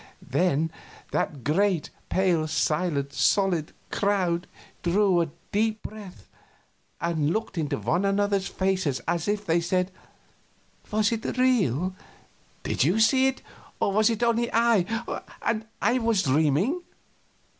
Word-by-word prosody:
Then 160 Hz, +1 st, +1 dB, 0.4 s
that 140 Hz, -5 st, -2 dB
great, 175 Hz, -, +1 dB, 0.2 s
pale, 175 Hz, -4 st, +2 dB
silent, 155 Hz, -2 st, 0 dB
solid 185 Hz, -6 st, +2 dB, 0.2 s
crowd 185 Hz, -4 st, 0 dB, 0.3 s
drew 180 Hz, 0 st, +3 dB
a 165 Hz, -, -1 dB, 0.2 s
deep 215 Hz, +1 st, 0 dB
breath 200 Hz, -, -10 dB, 0.7 s
and 160 Hz, -3 st, 0 dB
looked 220 Hz, +1 st, -2 dB
into 150 Hz, -4 st, -1 dB
one 175 Hz, +7 st, 0 dB
another's 200 Hz, 0 st, +1 dB
faces 185 Hz, -8 st, 0 dB
as 170 Hz, +1 st, -1 dB
if 205 Hz, 0 st, -1 dB
they 170 Hz, -1 st, +2 dB
said: 180 Hz, +2 st, 0 dB, 1.0 s
"Was 215 Hz, 0 st, +2 dB
it 230 Hz, +2 st, -3 dB
real? 190 Hz, -, +2 dB, 0.7 s
Did -, -, +1 dB
you 175 Hz, +10 st, +2 dB
see 260 Hz, +4 st, +5 dB
it, 265 Hz, 0 st, -3 dB, 0.4 s
or 200 Hz, -, +1 dB
was 215 Hz, +2 st, +4 dB
it 230 Hz, 0 st, -1 dB
only 235 Hz, 0 st, +1 dB
I 230 Hz, -2 st, +1 dB, 0.2 s
and 220 Hz, -1 st, -1 dB, 0.2 s
I 240 Hz, +5 st, +3 dB
was 225 Hz, -4 st, +2 dB
dreaming?" 160 Hz, -, +2 dB
190 Hz, 125 wpm, -26 LUFS, 165-215 Hz, 1.0 s, see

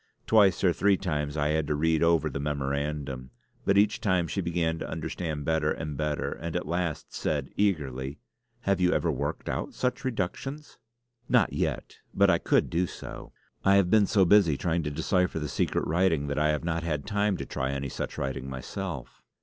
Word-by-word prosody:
Twice 100 Hz, -5 st, +4 dB
or 90 Hz, -3 st, +4 dB
three 100 Hz, +1 st, +3 dB
times 75 Hz, -5 st, -2 dB
I 75 Hz, 0 st, +1 dB
had 80 Hz, -1 st, +1 dB
to 75 Hz, -, 0 dB
read 80 Hz, +1 st, +2 dB
over 85 Hz, -2 st, +3 dB
the 70 Hz, -2 st, -4 dB
memorandum; 70 Hz, -2 st, -2 dB, 0.4 s
but 100 Hz, -, +3 dB
each 105 Hz, +1 st, +3 dB
time 95 Hz, -4 st, +2 dB
she 95 Hz, -, -2 dB
began 85 Hz, -2 st, -1 dB
to -, -, -5 dB
understand 75 Hz, -4 st, -4 dB
better 80 Hz, -1 st, +1 dB
and 75 Hz, -2 st, -4 dB
better, 75 Hz, +1 st, -1 dB
and 85 Hz, 0 st, -5 dB
at 90 Hz, -, -1 dB
last 85 Hz, -1 st, -2 dB
said -, -, -2 dB
eagerly: 70 Hz, -9 st, -1 dB, 0.4 s
"Have 100 Hz, -1 st, +1 dB
you 90 Hz, 0 st, +4 dB
ever -, -, +1 dB
worked -, -, -3 dB
out -, -, -3 dB
such 125 Hz, +2 st, -1 dB
reductions?" 130 Hz, +6 st, -4 dB, 0.5 s
"Not 120 Hz, -6 st, +3 dB
yet, -, -, -2 dB, 0.2 s
but 100 Hz, -1 st, +5 dB
I 85 Hz, -, +3 dB
could -, -, +2 dB
do 90 Hz, +2 st, +1 dB
so. -, -, -9 dB, 0.3 s
I 100 Hz, 0 st, +5 dB
have 100 Hz, -3 st, +3 dB
been 105 Hz, -2 st, +5 dB
so 95 Hz, -3 st, +4 dB
busy 85 Hz, -6 st, +5 dB
trying 85 Hz, +2 st, 0 dB
to -, -, 0 dB
decipher 90 Hz, +5 st, 0 dB
the 75 Hz, -1 st, -2 dB
secret -, -, 0 dB
writing 85 Hz, -3 st, +2 dB
that 70 Hz, -, -1 dB
I 75 Hz, 0 st, +3 dB
have 75 Hz, +1 st, 0 dB
not 85 Hz, 0 st, -1 dB
had 75 Hz, -3 st, -2 dB
time 105 Hz, -2 st, +1 dB
to -, -, -5 dB
try 65 Hz, 0 st, -2 dB
any 70 Hz, 0 st, -3 dB
such -, -, -5 dB
writing 65 Hz, 0 st, -3 dB
myself." 65 Hz, -2 st, -6 dB
80 Hz, 195 wpm, -28 LUFS, 75-95 Hz, 0.5 s, but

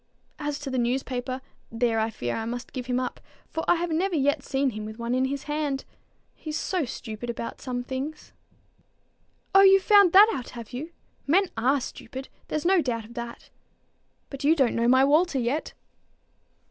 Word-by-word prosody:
As 295 Hz, -1 st, -2 dB
to 285 Hz, -2 st, -6 dB
the 260 Hz, -, 0 dB
newspaper, 255 Hz, +1 st, -2 dB, 0.3 s
there 230 Hz, -1 st, +1 dB
I 220 Hz, +1 st, +1 dB
fear 120 Hz, -, -3 dB
I 225 Hz, -, -3 dB
must 245 Hz, +2 st, -5 dB
give 250 Hz, -2 st, -5 dB
him 250 Hz, 0 st, +1 dB
up, 255 Hz, -, -4 dB, 0.3 s
for 320 Hz, -, -2 dB
I 350 Hz, -, +5 dB
have 345 Hz, 0 st, -2 dB
never 355 Hz, +3 st, +1 dB
yet 285 Hz, -1 st, +2 dB
seen 270 Hz, 0 st, 0 dB
him 215 Hz, -1 st, -6 dB
with 215 Hz, +1 st, -7 dB
one 235 Hz, +1 st, -2 dB
in 255 Hz, +1 st, +2 dB
his 275 Hz, +1 st, -3 dB
hand. 295 Hz, -2 st, -2 dB, 0.5 s
He's 310 Hz, -1 st, -5 dB
so 365 Hz, -6 st, -1 dB
stupid 230 Hz, -1 st, -7 dB
about 235 Hz, 0 st, -5 dB
some 245 Hz, -2 st, -3 dB
things!" 270 Hz, +5 st, -6 dB, 1.2 s
"Oh, 390 Hz, -, +8 dB
you've 390 Hz, 0 st, +7 dB
found 405 Hz, -4 st, +6 dB
that 405 Hz, +3 st, +9 dB
out! 255 Hz, -9 st, -5 dB
have 230 Hz, -1 st, -9 dB
you? 285 Hz, +7 st, -5 dB, 0.4 s
Men 360 Hz, +5 st, +3 dB
are 255 Hz, +5 st, +2 dB
stupid; 265 Hz, +1 st, -8 dB, 0.2 s
there's 305 Hz, +1 st, -3 dB
no 370 Hz, 0 st, +5 dB
doubt 230 Hz, -5 st, -2 dB
of 235 Hz, -, -13 dB
that. 235 Hz, -1 st, -8 dB, 0.8 s
But 275 Hz, 0 st, -7 dB
you 310 Hz, +3 st, +5 dB
don't 265 Hz, -6 st, +2 dB
know 235 Hz, 0 st, +1 dB
my 260 Hz, +2 st, +6 dB
Walter 310 Hz, +2 st, +3 dB
yet." 260 Hz, +5 st, -1 dB
265 Hz, 185 wpm, -26 LUFS, 240-310 Hz, 1.2 s, that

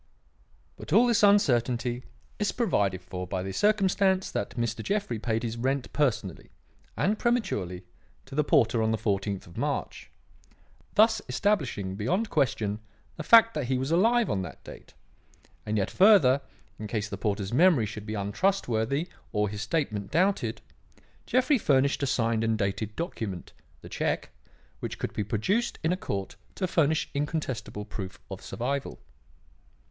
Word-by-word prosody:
But -, -, -10 dB
all 220 Hz, +8 st, +6 dB
this 235 Hz, -3 st, +3 dB
uncertainty 125 Hz, -, +2 dB, 0.3 s
is 210 Hz, -, +1 dB
provided 100 Hz, -, 0 dB
for 90 Hz, 0 st, -6 dB
by 90 Hz, 0 st, -3 dB
the 95 Hz, -, -4 dB
circumstance 195 Hz, -, +2 dB
that 120 Hz, -, -4 dB
Mr. 115 Hz, -1 st, -1 dB
Jeffrey 195 Hz, -, -2 dB
paid 115 Hz, +1 st, -1 dB
his 115 Hz, 0 st, -3 dB
rent 130 Hz, +2 st, -1 dB
personally 120 Hz, -, -1 dB, 0.5 s
and 210 Hz, +3 st, +1 dB
prematurely 100 Hz, -, -1 dB, 0.4 s
to 135 Hz, -, -13 dB
the 150 Hz, +2 st, +2 dB
porter 115 Hz, -5 st, +3 dB
on 110 Hz, -, +1 dB
the 110 Hz, -, +1 dB
fourteenth 100 Hz, -3 st, -2 dB
of 85 Hz, -, -15 dB
March, -, -, -3 dB, 0.9 s
thus 220 Hz, 0 st, +5 dB
establishing 130 Hz, -, 0 dB
beyond 180 Hz, -, -1 dB
question 110 Hz, -8 st, 0 dB, 0.4 s
the -, -, -6 dB
fact 230 Hz, +6 st, +7 dB
that 150 Hz, -4 st, -2 dB
he 130 Hz, +1 st, 0 dB
was 135 Hz, +4 st, -2 dB
alive 230 Hz, +7 st, +3 dB
on 95 Hz, -, -1 dB
that 85 Hz, -7 st, -8 dB
date; -, -, -13 dB, 0.7 s
and 105 Hz, 0 st, 0 dB
yet 95 Hz, -, 0 dB
further, 180 Hz, -10 st, +6 dB, 0.4 s
in 105 Hz, -, -5 dB
case 105 Hz, -1 st, -2 dB
the -, -, -5 dB
porter's 100 Hz, -1 st, -2 dB
memory 160 Hz, -4 st, +5 dB
should 105 Hz, 0 st, -7 dB
be 110 Hz, -, -3 dB
untrustworthy 125 Hz, -, 0 dB, 0.2 s
or 105 Hz, -1 st, 0 dB
his 105 Hz, 0 st, -5 dB
statement 110 Hz, -5 st, -2 dB
doubted, 190 Hz, +5 st, +1 dB, 0.7 s
Jeffrey 255 Hz, +1 st, +3 dB
furnished 140 Hz, -5 st, +2 dB
a 140 Hz, -, +1 dB
signed 115 Hz, -4 st, +1 dB
and 115 Hz, -1 st, +1 dB
dated 105 Hz, +2 st, -2 dB
document 110 Hz, -, -5 dB, 0.3 s
the -, -, -11 dB
cheque -, -, -2 dB, 0.5 s
which -, -, -5 dB
could -, -, -4 dB
be 105 Hz, -, -1 dB
produced 190 Hz, -, 0 dB
in 160 Hz, -, +2 dB
a -, -, +2 dB
court 100 Hz, -, -5 dB, 0.2 s
to 190 Hz, -, -1 dB
furnish 160 Hz, -2 st, +1 dB
incontestable 140 Hz, -8 st, -3 dB
proof 100 Hz, -2 st, -7 dB
of 95 Hz, -, -6 dB
survival. 135 Hz, +3 st, -3 dB
125 Hz, 155 wpm, -28 LUFS, -, 0.9 s, fact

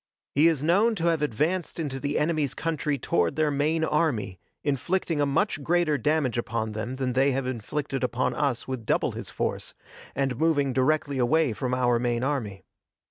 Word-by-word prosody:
He 150 Hz, +4 st, +5 dB
is 155 Hz, -4 st, +1 dB
known 205 Hz, +8 st, +3 dB
to 170 Hz, -4 st, -2 dB
have 165 Hz, -3 st, +1 dB
advanced 155 Hz, +8 st, -1 dB
into 140 Hz, -4 st, -3 dB
the 145 Hz, +2 st, -1 dB
enemy's 150 Hz, -3 st, 0 dB
country 155 Hz, -3 st, -1 dB
toward 85 Hz, -9 st, 0 dB
their 155 Hz, -1 st, +2 dB
main 155 Hz, +3 st, +1 dB
army, 150 Hz, -, 0 dB, 0.2 s
inflicting 150 Hz, +3 st, 0 dB
a 145 Hz, -, +2 dB
much 145 Hz, +2 st, 0 dB
greater 170 Hz, 0 st, +2 dB
damage 135 Hz, -3 st, +1 dB
upon 115 Hz, -2 st, -2 dB
them 110 Hz, +4 st, -4 dB
than 130 Hz, -1 st, -2 dB
they 135 Hz, +2 st, +3 dB
have 135 Hz, 0 st, -1 dB
inflicted 130 Hz, +3 st, -3 dB
upon 125 Hz, 0 st, 0 dB
us 140 Hz, -5 st, -1 dB
with 130 Hz, -3 st, -4 dB
double -, -, +1 dB
his -, -, -7 dB
force, -, -, -3 dB, 0.4 s
and 135 Hz, -2 st, -1 dB
moving 145 Hz, -4 st, +2 dB
directly 140 Hz, +1 st, +1 dB
away 145 Hz, +1 st, +3 dB
from 125 Hz, +2 st, -2 dB
our 120 Hz, -2 st, +2 dB
main 120 Hz, 0 st, 0 dB
army. 115 Hz, -9 st, -2 dB
140 Hz, 180 wpm, -26 LUFS, 125-155 Hz, 0.4 s, He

